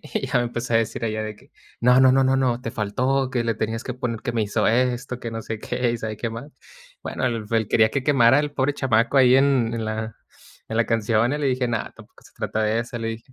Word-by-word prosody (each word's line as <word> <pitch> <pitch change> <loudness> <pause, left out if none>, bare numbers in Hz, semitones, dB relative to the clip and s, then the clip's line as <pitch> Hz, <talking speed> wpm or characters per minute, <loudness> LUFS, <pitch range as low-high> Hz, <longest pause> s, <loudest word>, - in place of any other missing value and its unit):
y - - -4
ya - - +1
me 120 - +1
empezó 120 0 -3
a - - +6
decir 115 +1 -2
ella, 110 -1 -2
de 110 -1 -6
que: - - -23 0.3
"No, 125 +2 +5
no, 130 -1 +6
no, 135 0 +4
no, 130 -2 +1
te 115 -3 -5
faltó, 130 +6 0
que 120 -2 -1
le 115 -1 0
tenías 110 +1 -3
que 125 - -4
poner 120 -3 -4
que 120 - -3
me 115 -2 0
hizo 100 -1 0
esto, 125 +1 0
que 115 - -5
no 115 0 -5
sé 110 0 -6
qué 125 -1 -1
y 120 - -3
sabe 110 -1 -5
qué 115 +1 -3
más". 120 +6 -8 0.5
Bueno, - - -4
el 115 -3 -2
el 110 -2 0
quería 110 -1 +4
que 140 - -2
quemara 130 -2 +4
al 150 - -3
pobre 145 0 0
chamaco 130 +1 +2
ahí 130 0 +6
en 135 -4 +2
en 115 -1 -3
la 110 0 -4 0.5
en 110 - -4
la 115 - +3
canción, 115 +2 +1
y 145 - -1
le 145 - -1
dije: 125 -2 0
"No, 115 -1 0 0.2
tampoco - - -18
se - - -19
trata 110 - -3
de 110 +2 +1
eso", 120 0 -6
le 115 - -4
dije. 115 +3 -7
120 Hz, 265 wpm, -23 LUFS, 110-130 Hz, 0.5 s, a